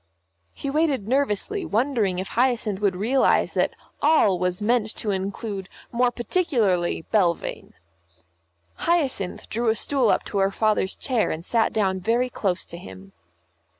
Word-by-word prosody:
He 275 - -4
waited 290 -8 +1
nervously, 280 - 0
wondering 220 -5 0
if 190 +1 -4
Hyacinth 235 -5 +1
would 200 -3 +2
realise 240 +8 +2
that - - 0 0.3
"all" 285 - +4
was 180 0 -1
meant 220 0 +1
to 210 - -1
include 195 0 -4 0.2
more 245 +1 +2
particularly 235 - 0
Belvane. 180 -6 0 1.0
Hyacinth 275 - 0
drew 230 +1 0
a 220 - +2
stool 260 0 +1
up - - +2
to 200 - -3
her 195 0 +3
father's 210 -1 0
chair 250 -5 0
and 160 +2 -4
sat 230 +1 +2
down 190 -3 0
very 235 +6 0
close 185 -6 -1
to 170 - -9
him. 95 - -12
215 Hz, 145 wpm, -24 LUFS, 190-250 Hz, 1.0 s, all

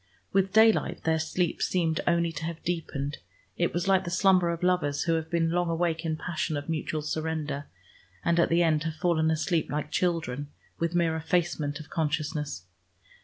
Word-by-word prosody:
With 195 0 +2
daylight 220 +1 +4
their 160 0 +2
sleep 170 +2 -1
seemed 165 -3 +1
only 170 -1 +2
to 160 0 -5
have 165 -1 -5
deepened: 155 -4 -3 0.4
it 175 - +1
was 175 +2 -2
like 190 -1 +4
the 175 - -4
slumber 185 -1 +4
of 170 +1 -3
lovers 165 -6 +1
who 165 - +1
have 160 0 -1
been 165 -1 +1
long 175 0 +1
awake 165 -1 0
in 160 -1 -1
passion 155 -2 -2
of 145 - -6
mutual 155 -1 -2
surrender, 155 -2 -3 0.6
and 170 0 +3
at 170 - +4
the 170 +1 +4
end 155 -2 +2
have 160 -1 -2
fallen 160 -1 +2
asleep 160 +1 0
like 150 0 -3
children, 155 -7 -1 0.3
with 170 +1 -1
mere 165 -2 +2
effacement 160 -3 -1
of 155 - -11
consciousness. 150 - -2
165 Hz, 180 wpm, -28 LUFS, 155-175 Hz, 0.6 s, daylight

